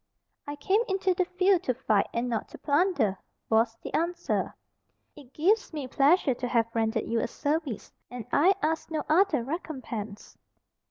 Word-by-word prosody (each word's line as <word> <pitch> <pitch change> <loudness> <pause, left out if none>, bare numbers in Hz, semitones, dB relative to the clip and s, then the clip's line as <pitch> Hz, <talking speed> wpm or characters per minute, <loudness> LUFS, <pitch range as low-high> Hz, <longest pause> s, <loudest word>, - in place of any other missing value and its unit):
"I 290 - -4
came 380 +9 +1
into 380 -1 +1
the 365 +1 0
field 370 0 +2
to 255 - 0
fight, 215 -5 +1
and 235 +2 -2
not 230 -3 -2
to - - -12
plunder," 285 - +1 0.3
was 225 +1 +2
the - - -7
answer: 340 +2 -1 0.6
"it 275 -4 -15
gives 395 +10 +1
me 290 -4 -4
pleasure 280 +2 +3
to 245 +1 -4
have 235 -2 +2
rendered 220 -1 0
you 230 0 0
a - - -1
service, 290 - -3 0.2
and 245 -3 -7
I 365 +7 +5
ask 320 +1 -1
no 315 -2 -2
other 315 -5 +3
recompense." 245 - -6
285 Hz, 165 wpm, -28 LUFS, 235-345 Hz, 0.6 s, I